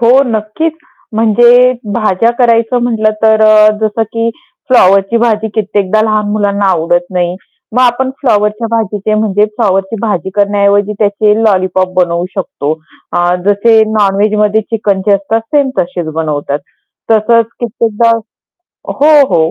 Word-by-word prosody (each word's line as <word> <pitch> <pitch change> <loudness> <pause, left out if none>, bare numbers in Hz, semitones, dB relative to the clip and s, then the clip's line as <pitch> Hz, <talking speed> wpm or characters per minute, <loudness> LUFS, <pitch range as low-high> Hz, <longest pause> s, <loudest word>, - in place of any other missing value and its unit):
हो, 235 0 +3 0.2
नक्कीच. 225 +8 -2 0.4
म्हणजे 240 +3 +4 0.2
भाज्या 215 0 +1
करायचं 235 0 +2
म्हटलं, 220 -3 0
तर 220 0 +3
अ, 215 0 +5
जसं 220 +1 -1
की 230 0 -1 0.4
फ्लॉवरची 195 -3 +3
भाजी 220 -2 0
कित्येकदा 210 -1 0
लहान 215 -1 0
मुलांना 205 -1 -1
आवडत 175 0 0
नाही, 180 -1 -1 0.4
मग 250 - +2
आपण 255 +1 +1
फ्लॉवरच्या 215 -3 0
भाजीचे, 215 -2 -1
म्हणजे 210 -1 +1
फ्लॉवरची 195 -1 -1
भाजी 205 -5 -2
करण्याऐवजी 205 0 +1
त्याचे 210 0 +1
लॉलीपॉप 185 -2 0
बनवू 175 -1 0
शकतो. 155 -6 -3 0.4
अ, 175 0 +1
जसे 220 +2 +3 0.2
नॉन-वेजमध्ये 210 +1 +1
चिकनचे 205 -2 -1
असतात 200 +3 -1
सेम 280 -2 +2
तसेच 175 -1 -2
बनवतात. 150 -3 -2 0.5
तसंच 225 +1 +3
कित्येकदा 230 -1 0 0.8
हो, 290 - 0 0.2
हो. 165 -3 +1
210 Hz, 125 wpm, -11 LUFS, 195-230 Hz, 0.8 s, अ